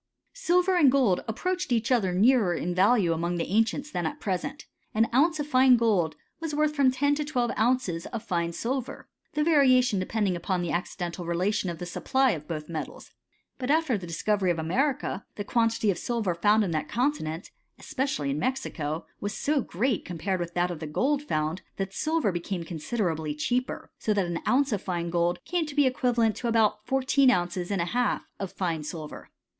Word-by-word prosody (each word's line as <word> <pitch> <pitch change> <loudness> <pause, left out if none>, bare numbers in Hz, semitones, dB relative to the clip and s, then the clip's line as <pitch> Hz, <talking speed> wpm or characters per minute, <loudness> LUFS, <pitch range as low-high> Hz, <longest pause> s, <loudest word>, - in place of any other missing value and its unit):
Silver 365 -6 +2
and 290 -6 +6
^old 250 -9 +2
approached 355 +8 -2
each 230 +1 +1
other 215 -7 +3
nearer 205 -1 +4
in 175 +2 -2
value 190 -1 +3
among 170 +2 -1
the 170 - -1
ancients 225 +8 0
than 175 -2 -1
at - - -6
present: 195 +9 -3 0.3
an 220 +1 +4
ouncci 310 +4 +3
of - - -3
fine 255 -3 +5
gold 195 -9 +1 0.2
was 325 -2 -3
worth 305 0 +2
from 280 -3 +4
ten 285 +3 +1
to 300 +1 -1
twelve 250 -5 -1
ounces 220 -8 0
of 230 -2 -5
fine 170 -5 -1
silver 255 +7 -4 0.2
y - - -43
the 300 0 +1
variation 255 - +4
depending 195 0 0
upon 175 +1 -1
the 175 - -2
accidental 175 0 -3
relation 185 +4 0
of 170 - -5
the 175 - -6
supply 260 +8 +1
of 150 -3 -5
both 155 -3 -5
metals. 160 -3 -6 0.5
But 255 0 -3
after 310 -4 +3
the 185 -4 -5
discovery 190 +3 0
of 175 - +1
America, 250 - -1
the 205 - -4
quantity 230 -1 +1
of 175 - -4
silver 230 -7 -1
found 210 +5 +3
in 185 - -2
that 155 -1 -2
continent, 210 - -2 0.3
especially 255 - -2
in 140 - -2
Mexico, 165 - -2
was 205 0 -4
so 290 -1 +1
gpreat, 225 +5 -1
compared 180 +2 -3
with 170 0 -5
that 175 0 +1
of 170 - -6
the 160 - -5
gold 275 - +1
found, 155 - -2 0.2
that 195 0 -3
silver 315 -4 0
became 175 0 -3
considerably 160 -3 -2
cheaper; 250 +11 -2
so 215 - 0
that 200 -2 +2
an 170 -1 -3
ounce 275 +1 +3
of 205 -3 -1
fine 170 -2 -3
gold 175 0 +1
came 350 -3 -1
to 290 - -8
be 290 -2 +4
equivalent 240 -4 +2
to 245 - -3
about 220 -2 +2
fourteen 270 0 +3
ounces 175 -4 0
and 195 -4 0
a 170 - -5
half 245 0 0
of 195 -2 -4
fine 170 -4 -2
silver. 150 0 -7
210 Hz, 195 wpm, -27 LUFS, 175-260 Hz, 0.5 s, and